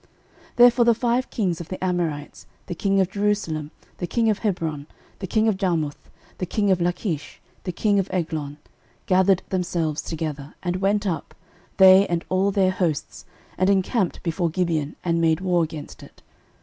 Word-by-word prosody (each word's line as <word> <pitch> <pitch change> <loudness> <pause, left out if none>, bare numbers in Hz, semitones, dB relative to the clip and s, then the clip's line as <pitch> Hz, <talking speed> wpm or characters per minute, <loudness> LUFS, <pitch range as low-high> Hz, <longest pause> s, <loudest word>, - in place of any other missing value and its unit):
06:010:005 - - -32 0.5
Therefore 240 0 +6
the 235 - +6
five 245 +2 0
kings 180 -7 -1
of 170 - -10
the 185 - -5
Amorites, 170 -5 -3 0.2
the - - -5
king 195 +3 +1
of 190 -1 +1
Jerusalem, 200 -7 -1 0.3
the 175 - -3
king 225 +3 +2
of 210 - -2
Hebron, 160 -8 -2 0.3
the 190 - -5
king 220 +4 +2
of 215 -4 +1
Jarmuth, 165 -7 -2 0.3
the 180 - -2
king 205 +1 +1
of 185 -2 +2
Lachish, 175 -2 -2 0.3
the 180 - -2
king 205 +3 +1
of 195 - -2
Eglon, 155 -5 -3 0.5
gathered 190 0 +3
themselves 175 -5 -1
together, 155 -3 -5
and 180 0 -1
went 200 +2 +1
up, 175 -5 -3 0.4
they 190 +1 +8
and 170 -1 -2
all 190 +2 +2
their 190 -2 +2
hosts, 175 -5 -2 0.3
and 185 +1 +3
encamped 195 0 0
before 170 0 0
Gibeon, 160 -4 -1
and 170 -1 +1
made 160 -1 +3
war 180 -2 +1
against 155 -2 -7
it. - - -16
180 Hz, 175 wpm, -23 LUFS, 165-200 Hz, 0.5 s, they